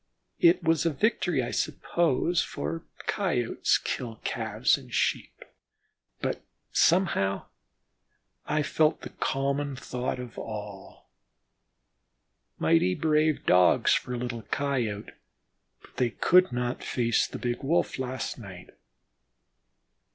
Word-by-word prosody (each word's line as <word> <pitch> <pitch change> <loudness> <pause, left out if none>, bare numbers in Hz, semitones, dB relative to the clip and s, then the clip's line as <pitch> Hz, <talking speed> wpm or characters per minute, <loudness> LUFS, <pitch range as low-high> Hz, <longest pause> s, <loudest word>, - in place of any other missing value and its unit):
It 345 +1 +5
was 160 -2 +2
a 170 - +2
victory, 175 - +1
I 120 - -4
suppose, 165 +3 +1
for 75 +3 -4 0.2
Coyotes - - +1
kill 120 -4 -4
Calves - - +1
and - - -11
Sheep, - - -1 0.8
but - - -2 0.3
somehow 160 - +2 1.0
I 150 0 +1
felt 155 +1 +2
the - - -8
common 140 +1 -1
thought 125 -1 -3
of 125 -2 -8
all: 105 - -8 1.5
"Mighty 85 +3 +3
brave 155 -1 +1
Dogs 90 0 +5
for 125 - -1
a - - -3
little 120 -1 -4
Coyote, 120 -7 -2 0.7
but - - -20
they 125 - +2
could 180 +9 +4
not 125 0 -2
face 115 -2 +1
the - - -7
big 120 0 -3
Wolf 150 0 0
last 130 0 -4
night." 95 -5 -11
125 Hz, 115 wpm, -28 LUFS, 110-155 Hz, 1.5 s, It